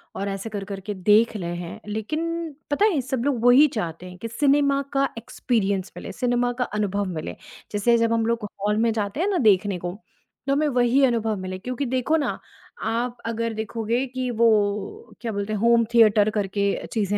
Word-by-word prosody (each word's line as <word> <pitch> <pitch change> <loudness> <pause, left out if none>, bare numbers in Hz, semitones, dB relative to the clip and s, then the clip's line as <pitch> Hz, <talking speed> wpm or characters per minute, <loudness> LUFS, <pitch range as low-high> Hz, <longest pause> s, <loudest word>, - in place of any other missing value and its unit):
और 200 +1 -3
ऐसे 195 +3 -4
कर-कर 200 -1 -5
के 210 - -1
देख 210 +4 +3
ले 175 - -5
हैं। 175 0 -6
लेकिन 315 +9 -3 0.2
पता 400 +9 +3
है, 350 -10 +2
सब 255 -1 -3
लोग 265 -5 0
वो 245 - +6
ही 285 +5 +7
चाहते 170 -2 -4
हैं 180 - -11
कि 230 - -3
सिनेमा 280 +2 +2
का 275 0 +2
एक्सपीरियंस 200 -5 -1
मिले, - - -7
सिनेमा 245 +3 0
का - - +3 0.2
अनुभव 205 -1 0
मिले। 155 - -5 0.4
जैसे 225 +3 +3
जब 230 0 +2
हम 225 -1 +1
लोग 230 -2 -1 0.2
हॉल 210 +1 +1
में 230 0 +2
जाते 210 +5 -3
हैं 375 - +1
ना 385 - +1
देखने 205 - +3
को, 175 +2 -5 0.5
तो - - +2
हमें 300 +2 +2
वही 250 +1 +3
अनुभव 225 -3 0
मिले 185 0 -5
क्योंकि 255 +5 -3
देखो 255 +5 0
ना, 290 - -2 0.4
आप 235 +2 -1
अगर 230 0 -2
देखोगे 225 +3 -2
कि 255 0 -3
वो 230 0 +3 0.7
क्या 230 -2 -3
बोलते 205 +1 -3
हैं, 210 - -1
होम 235 +1 +4
थिएटर 215 -2 +5
करके 200 -1 -1 0.3
चीज़ें 205 -2 0
230 Hz, 195 wpm, -24 LUFS, 205-250 Hz, 0.7 s, ही